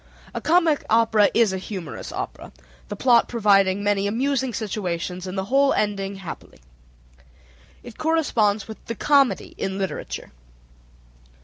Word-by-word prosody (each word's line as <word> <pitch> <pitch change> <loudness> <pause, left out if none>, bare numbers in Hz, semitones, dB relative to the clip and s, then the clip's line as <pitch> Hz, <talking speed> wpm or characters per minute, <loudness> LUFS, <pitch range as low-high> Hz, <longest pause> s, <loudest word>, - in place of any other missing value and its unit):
A - - -4
comic 330 -2 +3
opera 220 -2 +4
is 225 -4 +4
a 190 - -2
humorous 185 -4 -7
opera, - - -6 0.4
the - - -5
plot 240 -3 +4
providing 200 -4 +3
many 200 -1 +1
amusing 265 +4 0
situations 185 -4 -4
and 185 +1 -5
the 190 - -1
whole 275 +5 +3
ending 200 -1 -1
happily. 190 - -9 1.3
It 240 -2 -12
corresponds 235 -11 +1
with 220 - -10
the 230 - -4
comedy 280 +1 +2
in 190 0 -2
literature. 190 -1 -5
210 Hz, 130 wpm, -23 LUFS, 195-245 Hz, 1.3 s, opera